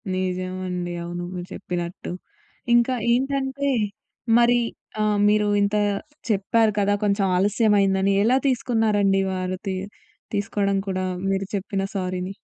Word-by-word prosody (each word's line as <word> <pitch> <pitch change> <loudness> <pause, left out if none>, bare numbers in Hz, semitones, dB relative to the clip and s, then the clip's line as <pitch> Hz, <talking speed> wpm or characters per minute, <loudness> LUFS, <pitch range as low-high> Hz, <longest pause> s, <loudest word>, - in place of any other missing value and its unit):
నిజమండి, 185 -1 -3
అవును 175 +1 -5
మీరు 180 0 -6
చెప్పినట్టు. 175 0 -5 0.6
ఇంకా 240 +2 +3 0.2
ఏంటంటే, 270 +2 0 0.7
మరి 240 0 +5 0.7
మీరు 210 0 +3
ఆహ్, 205 - +2
ఇంత 200 +1 +1 0.5
చెప్పారు 215 +2 +2
కదా! 205 0 +2
కొంచెం 200 -1 +2
ఆలస్యమైందని 200 -1 +3
ఎలా 245 +4 +4
తీసుకున్నారండి. 215 -6 +2
వారు 185 0 -2
తీ 190 - -1 0.6
తీసుకోవడం 200 -1 0
కూడా 185 -1 -1 0.3
మీరు 195 0 0
చెప్పిన 195 0 -2
సారీని. 185 0 -2
200 Hz, 110 wpm, -23 LUFS, 185-220 Hz, 0.7 s, మరి